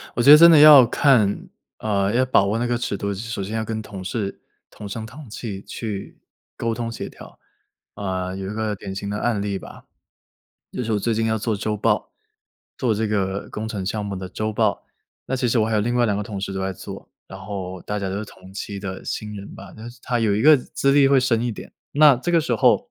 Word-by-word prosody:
我 120 - +1
觉 140 - +7
得 150 - +12
真 170 +1 +9
的 160 - +7
要 145 -4 +10
看 115 -5 +2 0.3
呃， 100 -1 0
要 130 +2 +3
把 130 -6 +4
握 100 +3 0
那 120 - -1
个 120 0 0
尺 120 -4 -3
度， 100 +1 -2
首 110 0 -5
先 105 +4 -5
要 110 - -1
跟 110 0 -4
同 100 -3 -9
事 100 +1 -4 0.3
同 105 - -9
声 110 +2 -5
同 130 +3 -11
气 105 -3 -6
去， 105 -4 -7 0.4
沟 115 -1 -2
通 115 0 -4
协 115 - -6
调。 - - -14 0.6
呃， 95 -2 -3
有 95 0 -5
一 - - -5
个 110 -1 -2
典 95 0 -7
型 100 +1 -5
的 105 - -3
案 120 -4 0
例 100 -1 -2
吧， - - -13 0.9
就 - - -3
是 115 -1 -2
我 105 - +1
最 115 +3 -1
近 110 +1 0
要 110 0 +1
做 110 0 -1
周 105 +1 -2
报 105 - 0 0.6
做 120 -4 0
这 110 +1 -1
个 100 -2 -2
工 110 - -5
程 105 -4 -4
项 105 0 -2
目 100 -1 -4
的 95 0 -6
周 110 +3 -3
报。 110 -1 0 0.4
那 130 - -2
其 125 -1 0
实 115 - +2
我 110 - +2
还 110 - -1
有 105 - +3
另 120 +3 -1
外 120 -1 +3
2 105 -3 +1
个 105 - -2
同 100 -1 -6
事 95 - -4
都 95 - -4
在 95 0 -2
做， - - -10 0.2
然 95 - -10
后 95 -2 -6
大 105 0 -3
家 100 - -3
都 95 +1 -3
是 110 - -4
同 95 -2 -15
期 100 +1 -6
的 95 -1 -6
新 105 -1 -5
人 100 - -9
吧。 100 -1 -11
但 110 +2 -9
是 120 - -17
他 120 -2 -1
有 110 -3 +2
一 110 - 0
个 155 +2 +8
资 140 +1 -1
历 140 -1 +5
会 140 -1 +5
深 120 -3 +1
一 120 - -1
点， - - -10 0.2
那 150 -1 +7
这 135 +8 -3
个 170 - +5
时 160 - -1
候 485 - +3
110 Hz, 265 characters per minute, -22 LUFS, 100-120 Hz, 0.9 s, 得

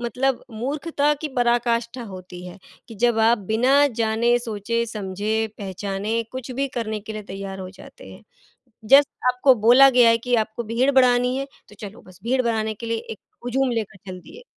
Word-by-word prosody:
मतलब 255 +2 -1
मूर्खता 285 +6 -1
की 310 - -2
पराकाष्ठा 240 0 0
होती 180 -1 -10
है 180 - -11 0.3
कि 230 - -10
जब 235 +1 +1
आप 225 +1 +4
बिना 250 +8 +3
जाने, 230 +2 +2
सोचे, 230 0 -3
समझे, 215 +1 -2
पहचाने 200 +3 -3
कुछ 260 -1 -7
भी 275 +2 -2
करने 215 -2 -3
के 220 +2 -8
लिए 215 - -6
तैयार 195 0 -6
हो 185 - -7
जाते 190 - -14
हैं। - - -14 0.7
जस्ट 280 +1 +7 0.2
आपको 255 +1 +4
बोला 260 +3 +8
गया 245 -2 +5
है 230 - +3
कि 245 +1 -2
आपको 220 +2 -7
भीड़ 235 +5 +1
बढ़ानी 250 -1 +3
है, 275 - -3 0.2
तो - - -16
चलो 210 +2 -9
बस 185 0 -18
भीड़ 255 +2 +1
बढ़ाने 220 -2 -1
के 230 +2 -9
लिए 230 0 -1
एक 220 - -9 0.2
हुजूम 255 +1 0
लेकर 220 -5 -3
चल 185 0 -8
दिए। 475 - -14
230 Hz, 185 wpm, -22 LUFS, 215-250 Hz, 0.7 s, बोला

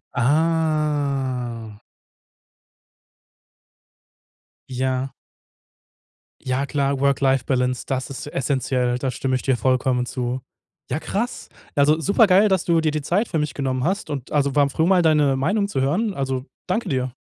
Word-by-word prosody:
Ah. 140 -6 0 2.9
Ja. 130 +1 -2 1.3
Ja 130 +2 -1
klar, 140 -1 -1
Work-Life-Balance, 130 -2 +1
das 130 -1 -2
ist 140 +1 -7
essenziell, 130 -3 0
da 130 0 -2
stimme 130 +1 -1
ich 130 - -1
dir 135 - +1
vollkommen 130 0 +1
zu. 125 0 -3 0.5
Ja 130 - -1
krass. 230 +9 -3 0.3
Also 150 +2 +4
supergeil, 200 +2 +4
dass 190 -2 +1
du 165 -2 +3
dir 155 -1 +1
die 155 0 -2
Zeit 190 +10 0
für 165 - -1
mich 150 -2 -2
genommen 130 -2 -2
hast, 195 +7 -1
und 140 -3 -5
also 140 -2 +1
war 145 -1 +4
froh 160 +4 0
mal 185 0 +4
deine 150 -4 +3
Meinung 200 +9 +1
zu 200 - -2
hören, 190 +11 0
also 135 -4 -3 0.2
danke 195 +6 -1
dir. 130 -2 -1
140 Hz, 135 wpm, -22 LUFS, 130-160 Hz, 2.9 s, Also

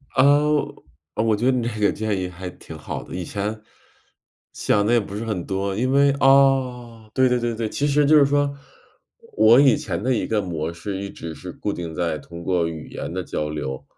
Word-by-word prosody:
呃， 130 - +5 0.9
呃 110 - 0
我 110 -2 +2
觉 115 +4 -2
得 130 - +5
你 125 -2 0
这 110 -2 -5
个 105 - +3
建 105 -3 -2
议 90 - -2
还 90 +1 -7
挺 80 - -11
好 75 - -6
的。 - - -11
以 90 - -3
前 105 +4 -4 0.9
想 105 0 +1
得 120 - +2
也 120 - +5
不 100 -1 -7
是 110 +2 -4
很 105 -6 -3
多， 95 0 -2
因 125 +5 0
为 140 +1 +4
啊， 130 -5 +2
对 130 +1 +4
对 125 0 +1
对 120 -1 -2
对。 110 -1 -3
其 145 - -2
实 145 +1 +3
就 155 +2 +6
是 145 - +6
说， 145 0 +1 0.8
我 110 +4 +7
以 135 -4 +6
前 85 -3 -4
的 130 +4 +1
一 120 - -1
个 110 -2 0
模 85 -3 -3
式， 95 +3 -5
一 100 0 -5
直 80 -3 -8
是 90 - -8
固 100 +4 -4
定 85 -2 -6
在 85 -2 -1
通 85 +4 -10
过 85 -1 +1
语 80 -2 -7
言 70 - -6
的 95 0 -3
交 75 -2 -3
流， 70 -3 -5
105 Hz, 240 characters per minute, -22 LUFS, 90-125 Hz, 0.9 s, 我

